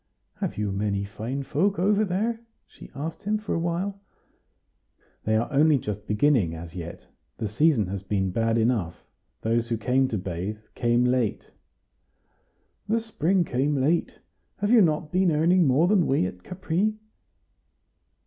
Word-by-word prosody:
"Have -, -, -3 dB
you 105 Hz, -1 st, -1 dB
many 100 Hz, 0 st, -1 dB
fine 115 Hz, +7 st, -5 dB
folk 160 Hz, +9 st, 0 dB
over 205 Hz, +4 st, +3 dB
there?" 215 Hz, +4 st, -1 dB, 0.2 s
she -, -, -14 dB
asked 155 Hz, +4 st, -5 dB
him, 210 Hz, +1 st, 0 dB
after 210 Hz, -, -4 dB
a -, -, 0 dB
while. 180 Hz, +4 st, -2 dB, 1.2 s
"They 110 Hz, 0 st, +2 dB
are 115 Hz, -, 0 dB
only 150 Hz, +1 st, +5 dB
just 105 Hz, -3 st, -5 dB
beginning; 105 Hz, -, +2 dB
as 80 Hz, 0 st, -9 dB
yet, 85 Hz, -2 st, -8 dB, 0.3 s
the 110 Hz, -, -2 dB
season 120 Hz, +1 st, +2 dB
has 95 Hz, +1 st, -4 dB
been 95 Hz, -1 st, -1 dB
bad 115 Hz, +3 st, +1 dB
enough; 110 Hz, -8 st, 0 dB, 0.4 s
those 115 Hz, +1 st, 0 dB
who 115 Hz, -1 st, -1 dB
came 130 Hz, +4 st, +2 dB
to 110 Hz, -, -2 dB
bathe, 95 Hz, +3 st, -4 dB, 0.2 s
came 120 Hz, 0 st, +2 dB
late." 125 Hz, -4 st, 0 dB, 1.4 s
"The 230 Hz, +1 st, +2 dB
spring 195 Hz, -5 st, +1 dB
came 140 Hz, 0 st, 0 dB
late. 155 Hz, +6 st, +1 dB, 0.4 s
Have 205 Hz, +2 st, 0 dB
you 240 Hz, -3 st, +7 dB
not 155 Hz, -3 st, +1 dB
been 185 Hz, -1 st, +3 dB
earning 165 Hz, +2 st, +3 dB
more 140 Hz, +7 st, +4 dB
than 190 Hz, -4 st, +3 dB
we 135 Hz, -9 st, +2 dB
at 90 Hz, 0 st, -6 dB
Capri?" 185 Hz, -, -1 dB
135 Hz, 155 wpm, -26 LUFS, 105-175 Hz, 1.4 s, you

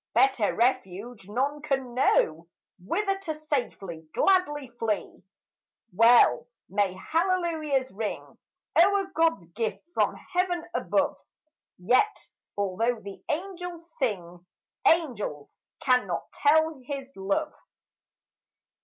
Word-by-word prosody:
Better 250 Hz, -3 st, +4 dB
refuge 230 Hz, -3 st, -1 dB
none 275 Hz, +7 st, -1 dB
can 270 Hz, -4 st, -2 dB
know 165 Hz, -9 st, +2 dB, 0.4 s
Whither 390 Hz, -, 0 dB
to 330 Hz, -5 st, -4 dB
safely, 235 Hz, -, -4 dB
gladly 295 Hz, -8 st, +2 dB
flee. 215 Hz, -2 st, -2 dB, 0.7 s
Well 230 Hz, +5 st, +6 dB, 0.2 s
may 200 Hz, -3 st, 0 dB
hallelujahs 320 Hz, -, 0 dB
ring 210 Hz, +2 st, -5 dB, 0.4 s
O'er 395 Hz, 0 st, +1 dB
God's 325 Hz, -, +2 dB
gift 220 Hz, +5 st, -3 dB
from -, -, +1 dB
heaven 360 Hz, -2 st, -1 dB
above; -, -, +1 dB, 0.6 s
Yet, 250 Hz, -, +3 dB, 0.4 s
although 210 Hz, +4 st, 0 dB
the 200 Hz, -1 st, -10 dB
angels 345 Hz, -1 st, -5 dB
sing, 180 Hz, -, -2 dB, 0.4 s
Angels 235 Hz, -, +1 dB, 0.3 s
cannot 255 Hz, -2 st, +1 dB
tell 315 Hz, -1 st, +3 dB
his 275 Hz, 0 st, -6 dB
love. 200 Hz, +11 st, -1 dB
265 Hz, 95 wpm, -27 LUFS, 205-325 Hz, 0.7 s, Well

